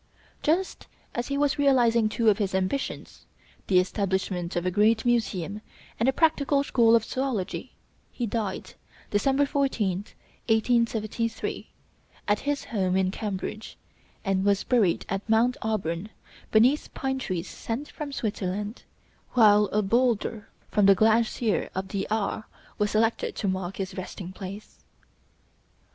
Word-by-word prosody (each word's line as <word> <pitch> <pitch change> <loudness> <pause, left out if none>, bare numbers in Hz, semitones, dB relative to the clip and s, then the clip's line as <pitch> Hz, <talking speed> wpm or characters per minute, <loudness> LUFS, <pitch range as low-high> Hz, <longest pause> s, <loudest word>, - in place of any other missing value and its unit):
Just 350 +5 0 0.3
as 240 0 -2
he 280 - -1
was 290 +1 +1
realizing 240 -5 +4
two 225 +1 0
of 205 - +2
his 195 -2 -1
ambitions, 190 +9 -3 0.4
the 185 - +4
establishment 185 -2 0
of 175 0 -1
a 185 - +1
great 215 +4 +3
museum 215 -5 0 0.4
and 230 +4 +3
a - - +4
practical 285 -2 +2
school 230 -4 +4
of 230 - +3
zoölogy, 250 -7 -3 0.4
he 245 - -3
died, 210 -3 -3 0.4
December 270 +7 +2
14th, 215 -9 -1 0.3
1873, 230 -1 0 0.6
at 205 0 +2
his 290 0 -2
home 190 -4 0
in 190 -1 +1
Cambridge, 210 +1 -5 0.5
and 190 -1 +1
was 200 0 +2
buried 215 -9 +2
at 195 +3 -4
Mount 235 +3 +3
Auburn 200 -3 -2 0.4
beneath 250 +7 +3
pine 265 0 -2
trees 185 -7 -3
sent 245 +6 -5
from 300 -2 -6
Switzerland, 205 -2 -3 0.5
while 210 -3 +6
a 210 +1 0
bowlder 230 0 0 0.2
from 205 -2 +4
the 195 - +7
glacier 220 +1 +2
of 190 +1 -3
the 195 -1 -2
Aar 215 0 -1 0.3
was 210 0 +2
selected 225 +2 +1
to 205 - -2
mark 185 -1 -2
his 190 -1 -4
resting 185 -1 -6
place. 195 +2 -9
215 Hz, 135 wpm, -26 LUFS, 195-240 Hz, 0.6 s, the